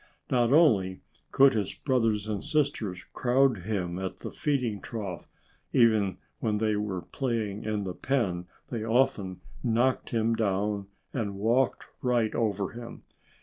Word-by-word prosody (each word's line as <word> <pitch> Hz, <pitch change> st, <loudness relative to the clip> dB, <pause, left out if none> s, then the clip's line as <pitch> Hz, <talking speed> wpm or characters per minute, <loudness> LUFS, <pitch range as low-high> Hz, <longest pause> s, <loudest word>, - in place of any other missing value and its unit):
Not 120 Hz, -1 st, +3 dB
only 105 Hz, -, +4 dB, 0.3 s
could 135 Hz, 0 st, +6 dB
his 105 Hz, -4 st, -1 dB
brothers 115 Hz, -6 st, +1 dB
and 105 Hz, -2 st, -2 dB
sisters 115 Hz, -, -1 dB
crowd 130 Hz, -2 st, +3 dB
him 90 Hz, -2 st, -2 dB
at 95 Hz, -1 st, -4 dB
the -, -, -5 dB
feeding 125 Hz, -9 st, -1 dB
trough. 100 Hz, -7 st, -5 dB, 0.5 s
Even 110 Hz, -6 st, +4 dB, 0.2 s
when 110 Hz, -2 st, 0 dB
they 110 Hz, 0 st, +1 dB
were 105 Hz, -4 st, -2 dB
playing 110 Hz, -6 st, -2 dB
in 105 Hz, -1 st, -1 dB
the 95 Hz, -2 st, -3 dB
pen 95 Hz, -9 st, -1 dB, 0.2 s
they 115 Hz, -3 st, -2 dB
often 110 Hz, -6 st, +1 dB, 0.2 s
knocked 125 Hz, +2 st, +1 dB
him 115 Hz, -1 st, +1 dB
down 100 Hz, -2 st, 0 dB, 0.3 s
and 105 Hz, -6 st, -2 dB
walked 115 Hz, +6 st, +1 dB, 0.2 s
right 120 Hz, -3 st, +1 dB
over 100 Hz, -4 st, 0 dB
him. 120 Hz, 0 st, -9 dB
110 Hz, 140 wpm, -28 LUFS, 100-120 Hz, 0.5 s, could